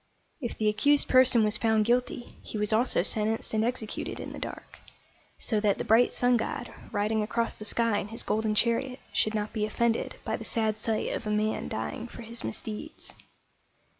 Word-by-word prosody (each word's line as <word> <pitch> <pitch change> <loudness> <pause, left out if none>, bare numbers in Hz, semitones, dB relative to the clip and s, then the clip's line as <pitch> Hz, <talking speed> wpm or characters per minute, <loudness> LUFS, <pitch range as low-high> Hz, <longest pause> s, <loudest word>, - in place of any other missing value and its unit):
If 240 - -4
the 215 - +1
accused 280 +8 +3
person 255 -3 +6
was 210 0 +2
found 220 -2 +3
guilty, 245 +1 0
he - - -6
was 210 +1 +1
also 225 -5 +3
sentenced 220 +3 0
and 220 0 +2
executed 230 -2 -3
in - - -6
the - - -7
dark, - - -8 0.6
so 215 - +1
that 205 -1 +2
the - - -2
bright 230 +3 +4
sun 245 0 +3
god, 235 +1 -4 0.2
riding 215 +1 +1
across 230 +2 -1
the 215 - -6
sky 225 -1 +1
in 200 - -4
his 225 +2 -2
golden 215 0 0
chariot, 250 +4 +2
should 215 0 +2
not 210 0 -2
be 215 -2 -1
offended 230 +2 0
by - - -1
the - - -8
sad 220 -2 0
sight 220 0 -1
of 225 - -4
a - - -1
man 215 +1 0
dying 110 - -4
for 235 - -10
his 230 +1 -6
misdeeds. 220 +8 -5
220 Hz, 195 wpm, -28 LUFS, 215-235 Hz, 0.6 s, person